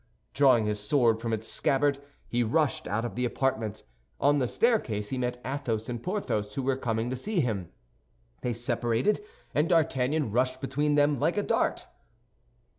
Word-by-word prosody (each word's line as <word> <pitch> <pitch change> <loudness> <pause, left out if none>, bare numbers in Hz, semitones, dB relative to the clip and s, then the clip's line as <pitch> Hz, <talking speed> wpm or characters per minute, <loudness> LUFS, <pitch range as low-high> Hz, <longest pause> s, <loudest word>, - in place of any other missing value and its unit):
Drawing 130 -5 +5
his 105 0 -1
sword 115 0 +2
from 115 -1 -2
its 110 0 -2
scabbard, 140 0 +1 0.3
he 120 - 0
rushed 140 +6 +1
out 110 +3 -1
of 120 - -4
the 125 - -2
apartment. 115 -4 -1 0.4
On 145 +1 +3
the 125 - +1
staircase 120 - +1
he 130 - -3
met 125 0 -2
Athos 120 -5 -2
and 120 -2 -4
Porthos, 150 - -2
who 135 - -2
were 135 0 +1
coming 115 -2 -2
to - - -1
see 195 - -2
him. 105 - -1 0.7
They 125 - -1
separated, 120 - 0 0.3
and 150 +2 +2
D'Artagnan 145 - +2
rushed 130 +3 +1
between 145 +2 0
them 145 -2 +3
like 175 - +1
a 205 - +2
dart. - - 0
125 Hz, 170 wpm, -28 LUFS, 115-145 Hz, 0.7 s, Drawing